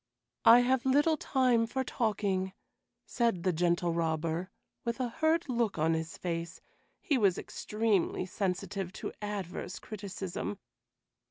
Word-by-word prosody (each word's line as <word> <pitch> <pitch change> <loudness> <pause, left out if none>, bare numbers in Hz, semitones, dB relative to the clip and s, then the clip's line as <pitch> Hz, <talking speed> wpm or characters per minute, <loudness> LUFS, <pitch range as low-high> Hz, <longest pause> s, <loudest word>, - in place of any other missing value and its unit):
"I 235 +2 +9
have 255 0 +2
little 290 +4 +4
time 250 -5 +2
for 265 +3 -1
talking," 195 -6 -1 0.5
said 230 -8 0
the 185 -1 +2
Gentle 175 +1 +1
Robber, 165 +2 -1 0.3
with 235 +1 -2
a 250 -2 0
hurt 320 +6 +1
look 235 -6 0
on 160 +1 +2
his 160 0 -3
face; 170 0 -4 0.4
he 295 -9 +1
was 195 -5 +3
extremely 210 -4 0
sensitive 190 0 -2
to - - -5
adverse 195 -3 -4
criticism. 200 -1 -5
200 Hz, 125 wpm, -31 LUFS, 175-240 Hz, 0.5 s, I